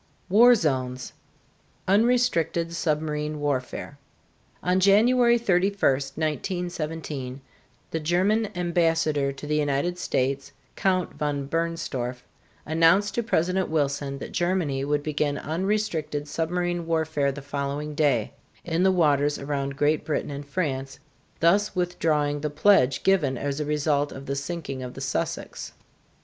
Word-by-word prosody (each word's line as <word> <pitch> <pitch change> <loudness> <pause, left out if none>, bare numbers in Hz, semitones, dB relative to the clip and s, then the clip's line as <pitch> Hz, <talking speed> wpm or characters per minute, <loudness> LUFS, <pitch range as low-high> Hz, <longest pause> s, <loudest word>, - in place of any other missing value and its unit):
[Illustration: 205 - +4
WAR 245 +1 +9
ZONES] 130 - -2 0.7
UNRESTRICTED 195 -6 +2
SUBMARINE 150 -2 -1
WARFARE. 140 0 -3 0.6
On 180 +1 +2
January 235 +5 +5
31, 200 -3 +1
1917, 155 -1 -3 0.5
the 160 - -1
German 190 +7 +1
ambassador 165 -5 +1
to 140 +2 -9
the 150 +1 0
United 150 +4 0
States, 135 -2 -1 0.2
Count 185 -2 0
von 145 -2 -2
Bernstorff, 140 -6 -3 0.4
announced 165 +6 +3
to 235 - 0
President 185 -3 0
Wilson 140 -2 -1
that - - -7
Germany 175 -7 0
would 145 +1 0
begin 145 -1 -1
unrestricted 165 -4 -2
submarine 175 +2 -2
warfare 160 -4 +1
the 140 0 -8
following 140 +1 -3
day, 140 -8 +1 0.3
in 165 0 0
the 190 +1 +5
waters 145 -5 +2
around 140 -1 -3
Great 150 +1 +2
Britain 150 - -2
and 140 0 -7
France, 135 -5 -3 0.4
thus 195 +5 +3
withdrawing 155 -5 0
the 150 - -1
pledge 150 -4 +3
given 155 -10 +2
as 140 +2 -3
a 150 - -1
result 145 -1 0
of 135 +1 -9
the 140 - -2
sinking 140 -2 -4
of 125 -1 -7
the - - -7
"Sussex." - - -3
155 Hz, 130 wpm, -25 LUFS, 140-180 Hz, 0.7 s, WAR